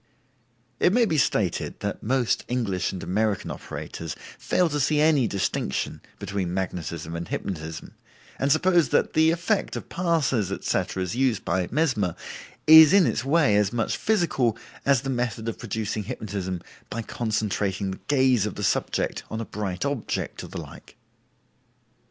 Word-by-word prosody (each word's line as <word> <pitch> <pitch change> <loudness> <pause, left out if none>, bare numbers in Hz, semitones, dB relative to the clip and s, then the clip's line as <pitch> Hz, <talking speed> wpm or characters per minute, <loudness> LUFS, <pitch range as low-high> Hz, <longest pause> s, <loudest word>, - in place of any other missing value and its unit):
It 180 - +4
may 240 0 +4
be 160 -8 +1
stated 100 -9 0
that - - -3
most 125 +1 +1
English 105 -8 -1
and 95 - -6
American 105 +3 0
operators 80 -2 -6 0.2
fail 180 -1 +2
to 150 -1 -1
see 150 +2 +2
any 150 -5 +4
distinction 95 -9 -2 0.2
between 95 -3 -3
magnetism 85 -3 -4
and 85 0 -4
hypnotism, 80 -4 -5 0.5
and 140 +1 +1
suppose 170 -1 +4
that - - +1
the 160 +1 +5
effect 175 +5 0
of - - -6
passes, 150 - +1
etc., 95 -1 -1
as 90 +5 -4
used 125 -5 +1
by 90 +1 0
Mesmer, 120 - +1 0.5
is 160 +1 +10
in 200 -3 +6
its - - 0
way 140 -5 +3
as 105 -1 +3
much 120 -1 -1
physical 150 - +1 0.3
as 140 -3 +4
the 135 - -2
method 120 -3 -2
of 115 - -4
producing 110 -2 -3
hypnotism 95 -4 -4 0.3
by 115 +1 -4
concentrating 105 -4 -1
the 95 - -7
gaze 130 -6 +3
of - - -6
the 105 - -5
subject - - 0
on 110 - -4
a 115 - -3
bright 100 0 -4
object, 140 -5 -3
or - - -7
the - - -6
like. - - -12
115 Hz, 155 wpm, -25 LUFS, 95-145 Hz, 0.5 s, is